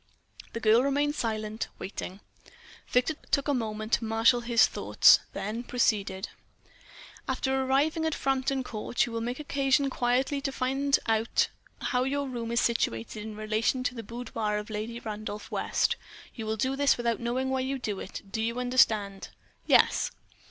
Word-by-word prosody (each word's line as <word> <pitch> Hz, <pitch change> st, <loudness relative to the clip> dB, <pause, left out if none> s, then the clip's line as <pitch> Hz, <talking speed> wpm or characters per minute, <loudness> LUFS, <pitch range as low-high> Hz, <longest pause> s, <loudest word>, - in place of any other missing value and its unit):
The 230 Hz, -, -3 dB
girl 225 Hz, +1 st, +5 dB
remained 285 Hz, +2 st, +1 dB
silent, 220 Hz, -4 st, -3 dB
waiting. 190 Hz, 0 st, -6 dB, 0.7 s
Victor 250 Hz, +6 st, +2 dB, 0.2 s
took 280 Hz, 0 st, +1 dB
a 290 Hz, -, +2 dB
moment 215 Hz, -2 st, -3 dB
to -, -, +3 dB
marshall 225 Hz, +2 st, +3 dB
his 235 Hz, -2 st, +5 dB
thoughts, -, -, +5 dB
then 215 Hz, +4 st, -3 dB
proceeded: 205 Hz, -6 st, 0 dB, 1.0 s
"After 265 Hz, -, -1 dB
arriving 285 Hz, +5 st, +1 dB
at 315 Hz, -, -1 dB
Frampton 270 Hz, 0 st, 0 dB
Court, 230 Hz, 0 st, -1 dB
you 235 Hz, -, -7 dB
will 230 Hz, 0 st, -3 dB
make 245 Hz, +3 st, -3 dB
occasion 275 Hz, -1 st, +1 dB
quietly 260 Hz, +4 st, +1 dB
to 275 Hz, -1 st, -2 dB
find 270 Hz, +2 st, +1 dB
out 225 Hz, 0 st, +2 dB, 0.3 s
how 250 Hz, -1 st, +1 dB
your 280 Hz, +1 st, -1 dB
room 235 Hz, -3 st, -4 dB
is 235 Hz, -, +2 dB
situated 210 Hz, -, -1 dB
in 215 Hz, 0 st, -7 dB
relation 215 Hz, +4 st, 0 dB
to 250 Hz, -, -1 dB
the 235 Hz, -, -6 dB
boudoir 225 Hz, -2 st, -3 dB
of 210 Hz, +1 st, -6 dB
Lady 220 Hz, +3 st, -4 dB
Randolph 215 Hz, -1 st, -6 dB
West. -, -, +1 dB, 0.4 s
You 225 Hz, -3 st, -6 dB
will 220 Hz, 0 st, -1 dB
do 260 Hz, +5 st, 0 dB
this 285 Hz, 0 st, +3 dB
without 235 Hz, -1 st, 0 dB
knowing 255 Hz, +3 st, -1 dB
why 265 Hz, -, +1 dB
you 265 Hz, +1 st, -1 dB
do 210 Hz, -6 st, -3 dB
it. 190 Hz, -, -7 dB
You 230 Hz, +2 st, -1 dB
understand?" 220 Hz, -6 st, +2 dB, 0.4 s
"Yes." -, -, +4 dB
235 Hz, 160 wpm, -28 LUFS, 220-265 Hz, 1.0 s, girl